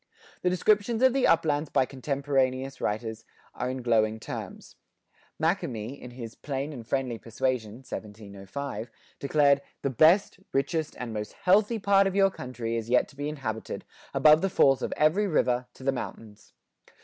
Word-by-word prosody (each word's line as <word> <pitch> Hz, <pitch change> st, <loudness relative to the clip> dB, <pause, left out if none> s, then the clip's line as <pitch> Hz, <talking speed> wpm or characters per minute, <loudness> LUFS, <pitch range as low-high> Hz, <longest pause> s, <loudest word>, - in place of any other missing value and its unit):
The 180 Hz, -, +2 dB
descriptions 210 Hz, +5 st, +2 dB
of 260 Hz, -1 st, +6 dB
the 270 Hz, -1 st, +3 dB
uplands 155 Hz, -2 st, +2 dB
by 130 Hz, -, +2 dB
contemporaneous 135 Hz, 0 st, -1 dB
writers 110 Hz, +1 st, -3 dB, 0.3 s
are 125 Hz, -, -3 dB
in 130 Hz, -1 st, -4 dB
glowing 110 Hz, -2 st, +2 dB
terms. -, -, -8 dB, 0.6 s
Makemie, 140 Hz, -, -2 dB
in 125 Hz, -, -8 dB
his 120 Hz, -2 st, -8 dB
"Plain 140 Hz, +1 st, -4 dB
and 120 Hz, -5 st, -9 dB
Friendly 130 Hz, -4 st, -1 dB
Persuasion" 115 Hz, -1 st, -2 dB
(1705), 105 Hz, +2 st, -7 dB, 0.3 s
declared 140 Hz, 0 st, +3 dB, 0.2 s
"The 140 Hz, -, 0 dB
best, 170 Hz, -, +4 dB
richest, 145 Hz, +3 st, -1 dB
and 120 Hz, -2 st, -5 dB
most 105 Hz, -1 st, -5 dB
healthy 205 Hz, +5 st, +3 dB
part 200 Hz, -1 st, +4 dB
of 195 Hz, -, -3 dB
your 195 Hz, -1 st, +4 dB
Country 120 Hz, -6 st, -5 dB
is 115 Hz, 0 st, -3 dB
yet 125 Hz, 0 st, +3 dB
to 140 Hz, -, -17 dB
be 145 Hz, +1 st, -3 dB
inhabited, 115 Hz, -7 st, -5 dB, 0.3 s
above 155 Hz, +1 st, +6 dB
the 195 Hz, -, +1 dB
falls 135 Hz, -6 st, +4 dB
of -, -, -2 dB
every 170 Hz, +8 st, +3 dB
River, 125 Hz, -7 st, +1 dB
to -, -, -13 dB
the 135 Hz, -, +2 dB
Mountains." 110 Hz, -5 st, -8 dB
135 Hz, 160 wpm, -27 LUFS, 115-155 Hz, 0.6 s, of